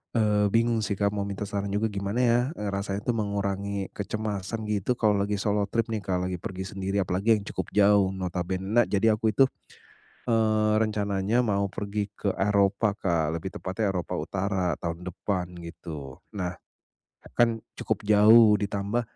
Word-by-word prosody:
eee, 105 -2 +3
bingung 115 +2 +2
sih 105 -2 -1
Kak, 100 +1 +1
mau 100 -1 -2
minta 100 0 -4
saran 100 0 -3
juga 105 +2 -1
gimana 100 +2 -3
ya, 120 0 +4 0.2
eee, 105 -7 -3
rasanya 100 0 -3
tuh - - +1
mengurangi 100 -2 -2
kecemasan 105 +1 -4
gitu. 105 +4 0
Kalau 105 -4 +2
lagi 100 +1 0
solo 100 0 0
trip 115 +2 -1
nih 110 - -1
Kak, 90 -2 -2
lagi 90 - -4
pergi 95 +1 -5
sendiri, 95 0 -1
apalagi 95 +5 +2
yang 105 - -4
cukup - - -3
jauh 100 -1 +5
notabene 90 0 -3
na 120 +2 +5
jadi 105 +2 +2
aku 110 -1 +1
itu, 135 +2 +5 0.7
eee, 110 -2 +2
rencananya 105 +1 +1
mau 100 -3 +1
pergi 100 +1 -3
ke 100 - -1
Eropa 100 +1 +2
Kak, 80 -5 0
lebih 95 +3 -5
tepatnya 95 +2 -1
Eropa 90 -2 -3
utara 95 -2 -1
tahun 85 +1 -4
depan 90 0 -3
gitu, 80 -5 -8 0.2
eee, 90 -3 -3 0.8
kan 115 -1 +3 0.2
cukup 105 - -3
jauh, 110 +1 +7
ditambah 100 +3 -1
100 Hz, 165 wpm, -27 LUFS, 95-110 Hz, 0.8 s, jauh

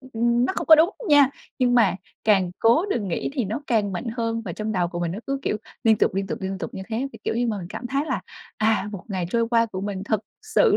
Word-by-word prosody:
ừm, 260 0 -15
ừm, 235 +2 +2
nó - - 0
không - - -2
có 315 - +10
đúng 320 +4 +5 0.2
nha, 285 -2 +6 0.3
nhưng 245 -1 +3
mà 200 -7 +4 0.3
càng 195 -4 +3
cố 235 - +4
đừng 210 - -1
nghĩ 170 - -2
thì 260 -6 -1
nó 220 +9 -3
càng 210 -5 +1
mạnh 180 - -4
hơn, 230 -1 -1
và 175 - -4
trong 215 +4 -3
đầu 180 -3 +1
của 175 0 -5
mình 170 -1 -1
nó 195 - -5
cứ, 275 0 -1
kiểu, - - 0 0.3
liên 220 -1 +5
tục, - - +2
liên 195 0 -1
tục, - - -4
liên 190 0 -3
tục 170 - -6
như 190 - -5
thế, 235 +4 -1
thì, - - -11
kiểu - - 0
như, 240 +1 +1
mà 215 -3 -1
mình 175 - -6
cảm 235 - -6
thấy 275 +4 0
là, - - -1 0.4
à, 215 -2 +1
một 190 - -7
ngày 185 -3 -2
trôi 230 +1 +1
qua 230 -1 +3
của 190 -4 -6
mình 195 -1 -4
thật 215 -1 0 0.2
sự 435 - +3
220 Hz, 285 wpm, -24 LUFS, 195-245 Hz, 0.4 s, có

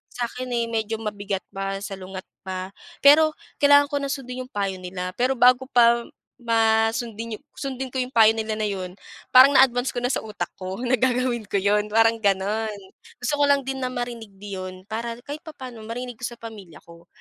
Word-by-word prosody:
sa'kin, 245 +1 -4
eh, 235 - +1
medyo 225 0 -1
mabigat 205 -3 -4
pa, 195 0 -3
salungat 190 -1 -7 0.2
pa, 185 0 -5 0.3
pero 310 +2 +7 0.2
kailangan 285 0 +6
ko 285 - 0
na 280 - -3
sundin 255 -2 -5
yung - - -41
payo 195 -2 -2
nila. 180 0 -5
Pero 255 +2 +2
bago 250 +1 +5
pa 235 -2 +4 0.3
ma 225 -1 +3
sundin 225 -1 -5 0.2
sundin 265 -1 -4
ko 255 - -16
yung 250 0 -2
payo 225 -3 +6
nila 220 -1 -3
na 215 - 0
yun, 185 -3 -4 0.4
parang 260 +2 +8
na-advance 255 -1 +4
ko 245 - -2
na 245 - +1
sa - - 0
utak 210 -2 -5
ko 185 +2 -5
na 250 0 +2
gagawin 250 -3 0
ko - - -4
yun, 210 +2 +2
parang 225 +1 +4
gano'n. 205 +2 0 0.5
Gusto 275 +4 +1
ko - - +4
lang 280 -1 +3
din 265 0 -4
na 255 - -1
marinig 240 -4 -5
din 200 +1 -10
'yon, 185 0 -7
para 230 +1 -4
kahit 290 +1 -6
papa'no, 260 -7 -9
marinig 245 0 -6
ko 250 - -4
sa 240 - -9
pamilya 205 -8 -11
ko. 170 0 -16
230 Hz, 195 wpm, -24 LUFS, 205-255 Hz, 0.5 s, parang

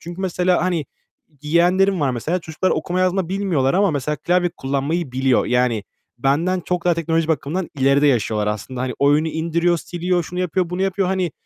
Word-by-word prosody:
Çünkü 175 +2 -8
mesela 180 -2 +1
hani 175 -4 0 0.6
yeğenlerim 180 +4 +2
var, 140 -3 +2
mesela, 140 +9 -2
çocuklar 160 +3 -2
okuma 175 +4 -1
yazma 185 -1 +1
bilmiyorlar 180 -9 0
ama 200 0 +3
mesela 150 0 -2
klavye 175 +4 +1
kullanmayı 140 +3 -2
biliyor. 130 0 +2
Yani, 125 -4 +1 0.3
benden 165 +9 +1
çok 180 +1 -3
daha 175 -1 +3
teknoloji 165 0 0
bakımından 160 +3 -1
ileride 140 +2 +4
yaşıyorlar 110 -5 +1
aslında. 110 +4 -4
Hani, 130 -1 -2
oyunu 145 +3 +3
indiriyor, 170 +2 0
siliyor, 175 +1 -1
şunu 180 +2 -7
yapıyor, 180 -1 -1
bunu 180 +1 -2
yapıyor 195 -1 0
hani 185 -4 -1
165 Hz, 175 wpm, -20 LUFS, 140-180 Hz, 0.6 s, ileride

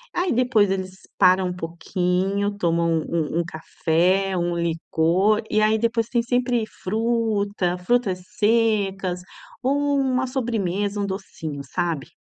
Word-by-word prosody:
Aí 360 0 +1
depois 235 -5 +3
eles 190 -1 -2 0.3
param 185 -1 +5
um - - -3
pouquinho, 180 +4 -1
tomam 170 -2 +1 0.2
um 165 0 -1
um - - +2
café, 180 +4 0
um 175 0 -1
licor, 170 +5 +1
e 215 - +3
aí 215 +1 +3
depois 230 0 0
tem 240 -2 +1
sempre 245 -1 +1 0.2
fruta, 210 -3 0
frutas 190 -2 0 0.2
secas 205 -5 +1 0.4
ou 285 +2 +1
uma 260 -1 +1
sobremesa, 205 -6 -1
um - - 0
docinho, 165 -7 -5
sabe. 165 -1 -2
195 Hz, 130 wpm, -23 LUFS, 175-230 Hz, 0.4 s, param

